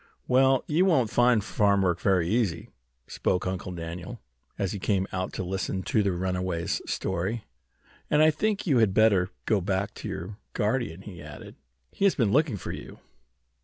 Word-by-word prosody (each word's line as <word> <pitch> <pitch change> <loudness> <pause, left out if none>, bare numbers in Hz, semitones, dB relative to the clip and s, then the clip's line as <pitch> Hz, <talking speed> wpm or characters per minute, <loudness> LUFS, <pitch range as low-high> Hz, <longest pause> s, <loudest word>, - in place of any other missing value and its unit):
"Well, 130 0 +4
you 165 +5 +2
won't 135 - +3
find 120 -3 +4
farm 100 -1 +2
work 90 -2 +1
very 90 -4 +2
easy," 100 -5 0 0.4
spoke 90 - -1
Uncle 95 0 -3
Daniel, 85 0 -6 0.4
as 95 -2 -1
he 100 - -4
came 95 0 +1
out 95 0 -3
to - - -3
listen 95 +1 -3
to 110 - +1
the 100 -1 +1
runaway's 90 -1 -2
story. 105 +6 -2 0.7
"And 150 +1 +4
I 155 - +6
think 205 +6 -1
you 140 -9 +3
had 105 -4 +3
better 100 -5 +4 0.2
go 105 -3 +2
back 95 +1 -1
to - - -7
your 100 +5 -6
guardian," 105 -5 -1
he 90 -6 -10
added. 75 0 -10 0.4
"He 200 - 0
has 195 - +4
been 115 -7 +2
looking 140 -4 +2
for - - -6
you." - - -8
100 Hz, 175 wpm, -27 LUFS, 90-120 Hz, 0.7 s, I